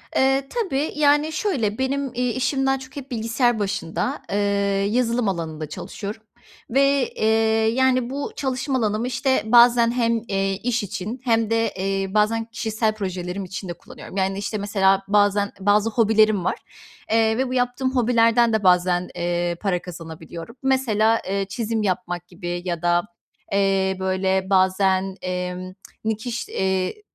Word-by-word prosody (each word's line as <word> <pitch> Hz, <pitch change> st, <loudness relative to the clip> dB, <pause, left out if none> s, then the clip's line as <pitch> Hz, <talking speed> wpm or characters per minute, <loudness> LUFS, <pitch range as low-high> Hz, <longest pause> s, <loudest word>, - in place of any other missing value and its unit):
Eee, 270 Hz, +1 st, +2 dB
tabii. 315 Hz, -, -1 dB
Yani, 295 Hz, +1 st, +3 dB
şöyle, 265 Hz, -, -1 dB
benim, 270 Hz, +1 st, -1 dB
iii, 250 Hz, 0 st, 0 dB
işim 270 Hz, +1 st, 0 dB
daha 270 Hz, 0 st, +2 dB
çok 265 Hz, +1 st, -12 dB
hep 275 Hz, -1 st, -8 dB
bilgisayar 230 Hz, 0 st, +1 dB
başında, 195 Hz, -4 st, -2 dB
eee, -, -, 0 dB, 0.5 s
yazılım 235 Hz, -2 st, +1 dB
alanında 160 Hz, -4 st, -4 dB
çalışıyorum 215 Hz, +5 st, -7 dB, 0.5 s
ve, 275 Hz, 0 st, +3 dB
eee, -, -, -1 dB, 0.5 s
yani, 255 Hz, -1 st, +2 dB
bu 280 Hz, +1 st, -4 dB
çalışma 265 Hz, 0 st, -1 dB
alanımı, 220 Hz, +1 st, 0 dB
işte, 260 Hz, +1 st, +1 dB
bazen 235 Hz, 0 st, +6 dB
hem, 230 Hz, -2 st, +1 dB
eee, 195 Hz, 0 st, 0 dB
iş 240 Hz, -2 st, 0 dB
için 210 Hz, +6 st, -5 dB
hem 225 Hz, -3 st, +2 dB
de, 225 Hz, -1 st, +1 dB
eee, 195 Hz, 0 st, -2 dB
bazen 225 Hz, +2 st, +2 dB
kişisel 220 Hz, -1 st, -1 dB
projelerim 185 Hz, -1 st, -4 dB
için 185 Hz, 0 st, -7 dB
de -, -, -2 dB
kullanıyorum. 185 Hz, -, -11 dB
Yani, 190 Hz, +1 st, 0 dB
işte, 205 Hz, +2 st, -3 dB
mesela, 195 Hz, -1 st, +2 dB
bazen 205 Hz, 0 st, +2 dB
bazı 205 Hz, +3 st, +3 dB
hobilerim 215 Hz, -3 st, +3 dB
var, -, -, 0 dB, 0.5 s
eee, 220 Hz, 0 st, +3 dB
ve 260 Hz, 0 st, 0 dB
bu -, -, -3 dB
yaptığım 255 Hz, +1 st, 0 dB
hobilerden 235 Hz, -1 st, +3 dB
de 220 Hz, -2 st, +1 dB
bazen, 180 Hz, 0 st, +3 dB
eee, 175 Hz, 0 st, -1 dB
para 185 Hz, -4 st, 0 dB
kazanabiliyorum. 165 Hz, -, -9 dB
Mesela, 225 Hz, -4 st, +2 dB
eee, 195 Hz, 0 st, -1 dB
çizim 225 Hz, -1 st, -2 dB
yapmak 180 Hz, -2 st, -2 dB
gibi 175 Hz, 0 st, -5 dB
ya 170 Hz, -2 st, -3 dB
da, 175 Hz, 0 st, +2 dB, 0.5 s
eee, 195 Hz, -1 st, +1 dB
böyle, 190 Hz, 0 st, 0 dB
bazen, 190 Hz, 0 st, +2 dB
emm, 180 Hz, 0 st, -4 dB, 0.3 s
nikiş 220 Hz, +2 st, -3 dB
eee, 190 Hz, -, -1 dB
215 Hz, 150 wpm, -22 LUFS, 190-245 Hz, 0.5 s, bazen